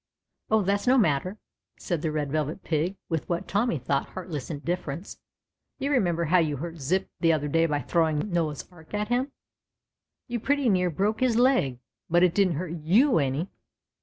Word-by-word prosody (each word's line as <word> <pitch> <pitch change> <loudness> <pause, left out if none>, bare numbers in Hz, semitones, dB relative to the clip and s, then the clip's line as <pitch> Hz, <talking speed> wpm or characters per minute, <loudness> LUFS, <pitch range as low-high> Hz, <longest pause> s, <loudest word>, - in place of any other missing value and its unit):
" - - -55
Oh, 220 -1 +3
that's 200 +3 0
no 260 +2 +5
matter," 180 - +1 0.4
said 170 -4 -3
the 160 - -1
Red 150 -2 -2
Velvet 155 +4 -2
Pig, 170 +5 -1
with 160 -7 -3
what 175 +2 -2
Tommy 205 -3 +1
thought 140 +1 -1
heartless 170 -7 -6
indifference; 170 +2 -4 0.6
"you 280 +2 -2
re 270 - +4
member 170 -4 0
how 180 +3 +4
you 150 -4 0
hurt 165 +3 -6
Zip 175 +8 0
the 165 -2 +4
other 150 -2 0
day 165 +3 +2
by 145 -2 -1
throwing 160 +6 0
Noah's 160 -4 -1
Ark 175 +2 -10
at 210 +1 -2
him. 255 +3 0 1.0
You 240 0 -2
pretty 280 +2 +1
near 180 -3 +2
broke 200 +7 0
his 255 -3 +2
leg, 240 - +3 0.3
but 175 +2 +4
it 180 -2 +4
didn't 190 -5 +2
hurt 170 +2 -4
you 175 - +3
any." 140 +6 -1
170 Hz, 190 wpm, -26 LUFS, 155-205 Hz, 1.0 s, no